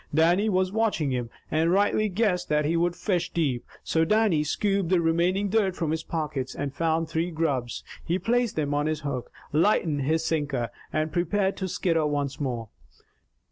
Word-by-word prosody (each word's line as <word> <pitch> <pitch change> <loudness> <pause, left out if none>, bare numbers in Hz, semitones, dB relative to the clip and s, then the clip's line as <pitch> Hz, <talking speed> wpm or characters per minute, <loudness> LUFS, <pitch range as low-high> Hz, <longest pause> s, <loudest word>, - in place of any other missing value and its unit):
Dannie 175 +7 +3
was 185 -1 +1
watching 210 -10 +1
him, 120 -2 -2 0.2
and 160 +2 +2
rightly 205 +2 +2
guessed 185 -3 0
that 150 0 +2
he 160 +3 +1
would 175 +1 +1
fish 180 -2 -1
deep. 140 -8 -1 0.2
So 160 - +2
Dannie 205 -4 +3
scooped 195 +3 0
the 185 -1 +4
remaining 170 +4 +2
dirt 195 -2 +1
from 165 -4 -1
his 160 0 -1
pockets, 150 -6 -3
and 140 -1 -3
found 165 +1 0
three 165 +2 -1
grubs. 145 -8 -2 0.2
He 175 +2 0
placed 235 +4 +1
them 145 -2 -1
on 145 +1 +1
his 155 -1 -1
hook, 140 -4 -4 0.2
lightened 160 -3 +2
his 160 +4 +1
sinker, 140 -8 -1 0.2
and 155 0 -1
prepared 190 +3 +1
to 190 - -2
skitter 165 -3 +1
once 145 -2 -2
more. 120 -6 -3
165 Hz, 180 wpm, -26 LUFS, 150-185 Hz, 0.2 s, the